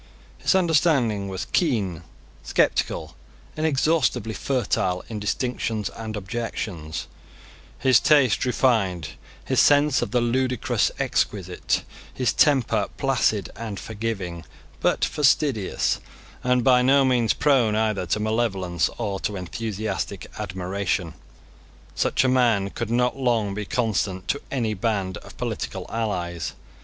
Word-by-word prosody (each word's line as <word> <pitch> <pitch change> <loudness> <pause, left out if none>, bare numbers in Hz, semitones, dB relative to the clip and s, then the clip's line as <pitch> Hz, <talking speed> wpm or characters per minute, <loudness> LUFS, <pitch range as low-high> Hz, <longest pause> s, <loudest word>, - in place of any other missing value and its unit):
His - - +2
understanding 145 - +2
was 95 -1 -4
keen, 105 - 0 0.4
sceptical, 75 -4 0 0.4
inexhaustibly 155 -6 +1
fertile 95 -8 0
in 110 -2 -4
distinctions 110 -1 -2
and 110 -1 -6
objections; 95 -6 -4 0.7
his 130 -3 +5
taste 140 -7 +4
refined; 110 - +1 0.4
his - - +1
sense 145 -1 +5
of - - -1
the 125 - +2
ludicrous 125 +1 +1
exquisite; - - -1 0.3
his 125 -3 0
temper 120 -8 +3
placid 120 -7 +1
and 110 -4 -5
forgiving, 100 -6 -4 0.4
but - - +2
fastidious, 135 -7 +1 0.4
and 125 -1 +2
by 125 -1 +5
no 135 +2 +5
means 120 -3 +3
prone 130 -7 +3
either 110 -4 0
to 105 - 0
malevolence 95 -6 0
or 100 -4 -2
to 105 - -2
enthusiastic 100 +2 -4
admiration. 95 -3 -2 0.8
Such - - +1
a - - +3
man 115 -6 +2
could 115 -2 -4
not 125 +2 +1
long 115 -6 +1
be 105 +1 -4
constant 100 -6 -1
to 140 - 0
any 115 -5 -1
band 100 -3 -1
of - - -13
political - - -4
allies. 90 -7 -2
110 Hz, 120 wpm, -24 LUFS, 95-125 Hz, 0.8 s, his